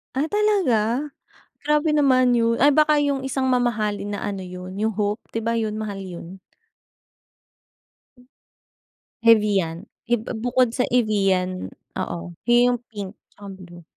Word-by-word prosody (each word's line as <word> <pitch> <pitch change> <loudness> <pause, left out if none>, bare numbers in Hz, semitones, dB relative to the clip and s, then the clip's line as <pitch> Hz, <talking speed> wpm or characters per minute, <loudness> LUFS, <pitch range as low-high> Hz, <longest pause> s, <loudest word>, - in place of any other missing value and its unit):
Ah, 290 +4 -1
talaga? 300 - +1 0.5
Grabe 300 +1 +2
naman 255 -4 +4
'yon. 230 0 +1
Ah, 280 - +5
baka 300 +1 +4
yung 280 -2 0
isang 265 0 -1
mamahalin 215 -5 0
na 205 - -3
ano 195 -2 -4
'yon, 180 +1 -8
yung 215 +2 0
Hope, 210 +1 -2
'di 225 - -2
ba 230 +1 -1
yun, 215 -1 -2
mahal 200 -3 -5
yun? 180 0 -9 2.9
Evian 205 -5 +3 0.2
eb 235 -2 +1 0.2
bukod 245 -1 +2
sa 250 - +1
Evian 195 -6 +1 0.3
oo, 175 0 -6
'yon 240 0 +4
yung 245 -1 +1
pink 205 -2 -7 0.2
tsaka 205 - -13
blue. 175 -2 -13
225 Hz, 135 wpm, -23 LUFS, 195-255 Hz, 2.9 s, Ah